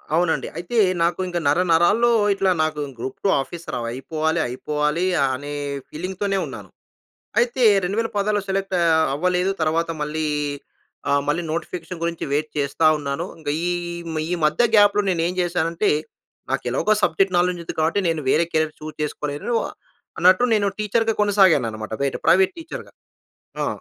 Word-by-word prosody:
అవునండి. 170 -1 +1
అయితే 175 +7 -4 0.3
నాకు 170 +2 0
ఇంక 175 -1 -3
నరనరాల్లో 175 +8 +3 0.2
ఇట్లా 195 -1 +1
నాకు 155 -1 -2 0.2
గ్రూప్-2 130 +11 -3
ఆఫీసర్ 165 +5 -7
అవ్ 115 - -4
అయిపోవాలి 155 +6 -2
అయిపోవాలి 150 +6 -1 0.3
అనే 145 +3 -5 0.4
ఫీలింగ్‌తోనే 190 +4 -3
ఉన్నాను. - - -9 0.7
అయితే 240 +1 +1 0.2
2016లో 205 0 0
సెలెక్ట్ 195 0 -1
ఆహ్, 160 -1 +4
అవ్వలేదు. 180 +4 +1
తర్వాత 165 +2 +1
మళ్ళీ 155 +1 -2 0.8
ఆహ్, 140 0 +2
మళ్ళీ 165 +4 +1
నోటిఫికేషన్ 170 0 -5
గురించి 170 -1 -2
వెయిట్ 150 +1 0
చేస్తా 145 +3 +1
ఉన్నాను. 145 +4 -3
ఇంకా 145 -2 -3
ఈ - - +1 0.5
మ్ 155 - -1
ఈ - - +1
మధ్య 155 +9 +3
గాప్‌లో 205 0 +5
నేను 165 -2 0
ఏం 180 - -4
చేశానంటే 175 +2 0 0.6
నాకు - - -1
ఎలాగో 215 - +1
సబ్జెక్ట్ 185 +3 +2
నాలెడ్జ్ 175 0 +1
ఉంది. - - -5
కాబట్టి 165 +6 +2
నేను 160 -2 0
వేరే 170 +2 +3
కెరీర్ 155 0 0
చూస్ 155 0 -8
చేసుకోలేను 150 +8 -3 0.6
అన్నట్టు 185 +7 +5
నేను 200 -1 +2
టీచర్‌గా 225 +1 +1
కొనసాగాను 190 - +4
అన్నమాట. 110 0 -7
బయట 140 - 0
ప్రైవేట్ 190 - +4
టీచర్‌గా. 330 +1 -8 0.7
ఆ! - - -1
170 Hz, 145 wpm, -22 LUFS, 155-195 Hz, 0.8 s, గాప్‌లో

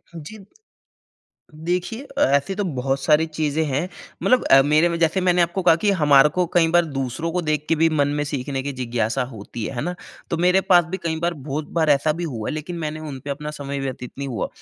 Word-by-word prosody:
जी। 190 +6 -10 1.1
देखिए 180 - -3 0.2
ऐसे 140 +7 +1
तो 205 - -1
बहुत 135 -4 -2
सारी 150 +3 +3
चीज़ें 155 -1 -1
हैं। 145 +5 -1 0.3
मतलब 255 - +3
अ, 135 - +7
मेरे 150 +4 +3
में 170 0 -2
जैसे 165 +3 +2
मैंने 180 -1 +3
आपको 175 +2 -1
कहा 175 - +6
कि 205 +4 +1
हमारे 150 -5 +5
को 180 -1 +2
कई 165 -2 +4
बार 175 - +5
दूसरों 140 +2 -3
को 180 - 0
देख 150 0 0
के 165 - +3
भी 165 +1 +4
मन 145 -3 +1
में - - +1
सीखने 135 -1 -3
की 140 - -4
जिज्ञासा 120 -1 -1
होती 110 +1 -7
है, 135 - -5
है 120 - -3
ना? 180 - -3 0.4
तो 170 - 0
मेरे 180 +3 +3
पास 175 -3 +4
भी 190 - -2
कई 160 -1 -1
बार 170 0 0
बहुत 145 +1 -5
बार 155 -2 +3
ऐसा 145 +2 +3
भी 170 +2 -4
हुआ 115 -9 -4
है - - -3
लेकिन 155 +3 -5
मैंने 155 -1 -4
उन 135 -2 -6
पे 145 - -5
अपना 150 +2 -4
समय 140 -2 -5
व्यतीत 130 -2 -5
नहीं 140 - -3
हुआ 120 - -3
155 Hz, 230 wpm, -22 LUFS, 140-170 Hz, 1.1 s, अ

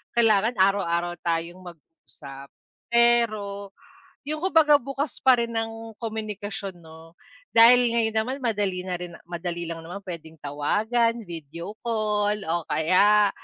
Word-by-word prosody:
kailangan 225 0 +3
araw-araw 175 -3 +1
tayong 170 +2 -2
mag-usap, 145 -4 -12 0.4
pero 215 -4 +1 0.5
yung 310 0 -3
kumbaga 320 -5 +5
bukas 275 +1 -4
pa 260 -1 +7
rin 235 0 -2
ang 225 -1 -5
komunikasyon, 210 -4 -5
'no? 160 +1 -15 0.4
Dahil 240 +2 +7
ngayon 220 -1 0
naman 255 +5 -2
madali 205 -5 -1
na 180 -1 -3
rin 175 -1 -8
madali 175 0 -4
lang 165 -1 -5
naman, 190 +4 -8
pwedeng 165 -4 -8
tawagan, 220 +11 0
video 170 +2 -8
call 210 -2 0
o 170 -1 -2
kaya 200 +5 +4
205 Hz, 125 wpm, -25 LUFS, 170-230 Hz, 0.5 s, pa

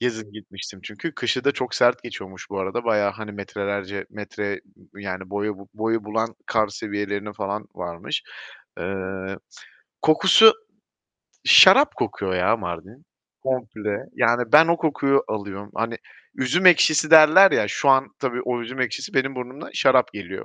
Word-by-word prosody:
gezip 110 -4 -4
gitmiştim 100 -2 -11
çünkü 140 +9 -7
kışı 125 +1 -2
da 140 - +3
çok 125 - -5
sert 120 0 +2
geçiyormuş 95 -6 -10
bu 100 - -5
arada, 95 +6 -4
bayağı, 105 -3 +1
hani. 105 0 -9
Metrelerce, 100 -1 -5
metre 100 -1 -6 0.4
yani 95 -2 -7
boyu 100 0 -3
bu 100 -1 -15
boyu 110 0 -2
bulan 110 +2 -3
kar 110 -2 0
seviyelerine 100 0 -5
falan 100 +2 -5
varmış. 85 -1 -5 0.6
Eee, 95 0 -5 0.7
kokusu, 190 - +6 0.9
şarap 285 +2 +7
kokuyor 95 -2 -3
ya 90 +5 +1
Mardin 95 - -8 0.4
komple. 110 -5 -3 0.2
Yani 120 0 +2
ben 155 +2 +8
o 170 - +3
kokuyu 140 -4 0
alıyorum. 100 -1 -6
Hani 115 +1 -3 0.4
üzüm 175 +9 0
ekşisi 155 -3 +5
derler 160 +5 +8
ya, - - +1
şu 140 - -1
an 135 0 +4
tabii 125 -2 -3
o 125 -1 -3
üzüm 130 +3 -7
ekşisi 115 -5 -4
benim 135 0 0
burnuma 125 +2 -8
şarap 130 -2 +3
geliyor. 95 -2 -8
110 Hz, 145 wpm, -22 LUFS, 100-130 Hz, 0.9 s, ben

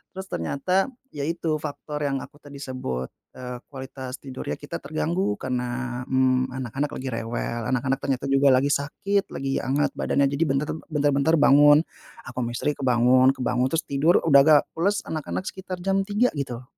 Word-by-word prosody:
terus 190 0 -6
ternyata, 140 - 0 0.2
ya, 145 0 -4
itu, 165 -2 -1
faktor 150 0 -6
yang 135 -1 -2
aku 145 - -14
tadi 145 -1 -13
sebut, 65 - -4 0.2
eee, 125 -1 -7
kualitas 130 -1 -7
tidurnya 130 - -5
kita - - -7
terganggu 90 +7 -1
karena, 125 0 -3
mmm, 130 -1 +2
anak-anak 130 +3 -3
lagi 130 - -5
rewel, 115 0 -3
anak-anak 135 +2 -1
ternyata 135 -2 -2
juga 135 +1 +4
lagi 140 +3 +2
sakit, 195 +8 0
lagi 135 0 -1
hangat 140 +2 0
badannya, 140 -1 +2
jadi 140 +3 +1
bentar 140 +1 0 0.2
bentar-bentar 145 0 +2
bangun, 145 0 +6 0.4
aku 130 - -11
ama 120 -1 -2
istri 150 - 0
kebangun 130 -1 +3
kebangun 125 -1 0
terus 165 +4 -1
tidur, 145 +5 +2
udah 140 -4 +6
agak 145 +1 +6
pules, 200 +5 0
anak-anak 155 +3 -4
sekitar 190 -1 -6
jam 195 +1 +1
3.00, 215 +5 +2
gitu, 125 -3 -4
135 Hz, 165 wpm, -24 LUFS, 125-150 Hz, 0.4 s, bangun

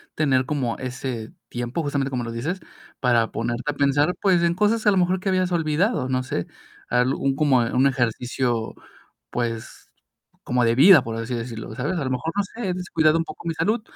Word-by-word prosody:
tener 130 -4 +2
como 130 -5 -2
ese 125 -3 -5 0.2
tiempo, 120 +6 -3
justamente 140 -2 -1
como 125 -2 -2
lo 115 - -5
dices, 145 +11 -3 0.4
para 120 -3 +2
ponerte 120 +1 -3
a - - -8
pensar, 145 +4 +2
pues, 185 -4 +3
en 170 0 +3
cosas 210 +4 +1
a 210 - +6
lo 195 - +2
mejor 185 +1 +2
que 195 - -2
habías 185 -1 +1
olvidado, 165 - +1
no 130 0 +1
sé, 105 -9 -3 0.4
al 125 +2 +2
un, 135 -1 0
como 145 -3 +3
un 125 +3 +2
ejercicio, 120 -2 -1 0.6
pues, 115 -2 -4 0.6
como 125 0 +1
de 115 0 +3
vida, 170 +7 +7
por 115 - -4
así 115 +2 -4
decirlo, 115 -2 -5
¿sabes?, 145 +9 -2
a 145 - -2
lo 130 - -2
mejor, 130 +6 -2
no 205 - +3
sé: 200 0 -5
"He 180 - -1
descuidado 165 -3 +2
un 165 - 0
poco - - -10
mi 165 - 0
salud, 215 +8 0
135 Hz, 200 wpm, -23 LUFS, 120-170 Hz, 0.6 s, vida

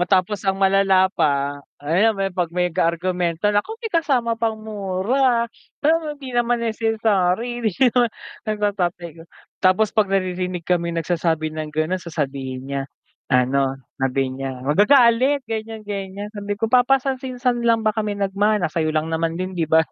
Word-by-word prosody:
Matapos 185 +2 +1
ang 190 - +2
malala 195 -1 +3
pa, 140 -2 0 0.2
ayan, 200 +8 +3 0.2
'pag 175 -2 -1
may 180 0 -1
argumento, 170 +1 -1
naku 320 - -1
may 450 -4 -6
kasama 265 -8 +1
pang 225 -1 0
mura, 220 +4 0 0.3
pero 310 -1 +1
hindi 265 -3 -9
naman 240 0 +1
necessary, 225 0 0
di 225 +3 +1
naman, 245 -1 +3 0.4
sabi 215 - 0
ng 205 0 0
tatay 175 0 -1
ko. - - -9 0.4
Tapos 195 +3 +3
'pag 215 -3 +2
naririnig 185 -2 -1
kami 170 -1 0
nagsasabi 160 -2 -1
ng 155 -1 -4
ganon 155 +4 -1
sasabihin 135 -6 -4
niya 140 0 -3 0.5
ano, 135 +1 +2 0.2
sabi 130 0 0
niya 130 -1 -6
magagalit, 240 - +4
ganyan-ganyan. 210 -3 -5
Sabi 205 -1 -4
ko, 215 - -2
"Papa 250 +2 +5
saan, 265 -1 -3
sinan 250 -2 -1
lang 230 -1 +2
ba 215 - +3
kami 210 -1 -2
nagmana, 200 -2 +1
sa'yo 160 -2 0
lang 155 +1 -1
naman 165 0 -1
din 185 +1 -4
'di 165 -4 -2
ba? 160 0 +5
195 Hz, 155 wpm, -21 LUFS, 165-225 Hz, 0.5 s, Papa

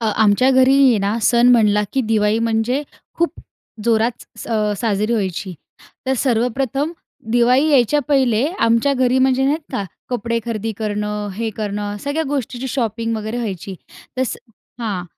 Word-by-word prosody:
अ, 225 - -1
आमच्या 220 +5 +4
घरी 260 +1 +5
आहे 230 -4 +3
ना, 200 +3 -1
सण 240 +2 +4
म्हणला 210 -3 +4
की 270 - +1
दिवाळी 210 0 +2
म्हणजे 230 +4 0 0.4
खूप 340 0 +1 0.5
जोरात 230 +1 +2 0.3
स - - -8
अ, 215 -2 0
साजरी 215 0 0
व्हायची. 190 -3 -2 0.5
तर 265 - +2
सर्वप्रथम 265 +5 0 0.4
दिवाळी 250 +5 +3
यायच्या 280 +1 +3
पहिले 260 -4 +2 0.2
आमच्या 230 +5 +3
घरी 255 0 +2
म्हणजे 265 0 +3
नाहीत 300 +4 +1
का 205 -6 -2 0.3
कपडे 230 -1 -1
खरेदी 225 -1 -3
करणं, 210 -1 -3
हे 225 +2 -2
करणं, 205 -1 -3
सगळ्या 285 +3 -1
गोष्टीची 265 -2 -3
शॉपिंग 230 -2 -2
वगैरे 220 +2 -4
व्हायची. 195 -4 -4 0.4
तर 260 - +1
स 260 - -2 0.4
हां. 200 -6 -3
230 Hz, 155 wpm, -19 LUFS, 210-260 Hz, 0.5 s, घरी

